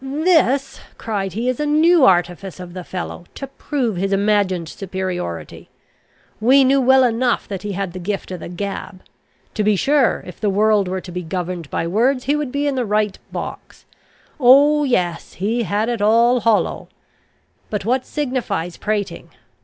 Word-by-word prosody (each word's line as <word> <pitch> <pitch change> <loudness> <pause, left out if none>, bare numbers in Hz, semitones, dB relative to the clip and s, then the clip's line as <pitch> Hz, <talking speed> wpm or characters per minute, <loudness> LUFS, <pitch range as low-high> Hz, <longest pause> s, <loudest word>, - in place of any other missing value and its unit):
"This," 280 -2 +1 0.2
cried 195 -4 -3
he, 230 +5 -2
"is 255 -1 -1
a 300 - 0
new 315 0 +5
artifice 180 -1 +1
of 180 -1 -9
the 185 -1 -6
fellow, 180 0 -6
to 275 - -5
prove 265 - -3
his 195 +2 -1
imagined 195 -4 +1
superiority. 185 - -5 0.7
We 260 +5 +5
knew 270 +1 +3
well 265 +1 +5
enough 245 0 +1
that 195 -3 -5
he 205 0 -4
had 195 -2 -3
the 185 - -6
gift 195 +1 -4
of 180 - -5
the - - -8
gab. 190 0 -6 0.5
To 215 - -1
be 210 0 +3
sure, 275 +5 +2
if 180 - -11
the 210 - +1
world 205 0 +2
were 185 +1 -3
to 180 - -10
be 180 +1 -4
governed 175 -2 -4
by - - -2
words, 245 +9 +1
he 285 +3 +1
would 295 -4 -3
be 285 +2 -1
in 285 - +1
the 255 -2 -1
right 210 -2 0
box. - - -7 0.5
Oh, 285 +4 +6
yes, 175 -10 -1
he 220 +6 -1
had 215 0 -1
it 235 -3 -2
all 235 +4 +4
hollow! 225 -1 +1 0.8
But 205 -2 -3
what 255 +3 +1
signifies 235 - -3
prating? 210 -2 -3
210 Hz, 175 wpm, -20 LUFS, 185-260 Hz, 0.8 s, Oh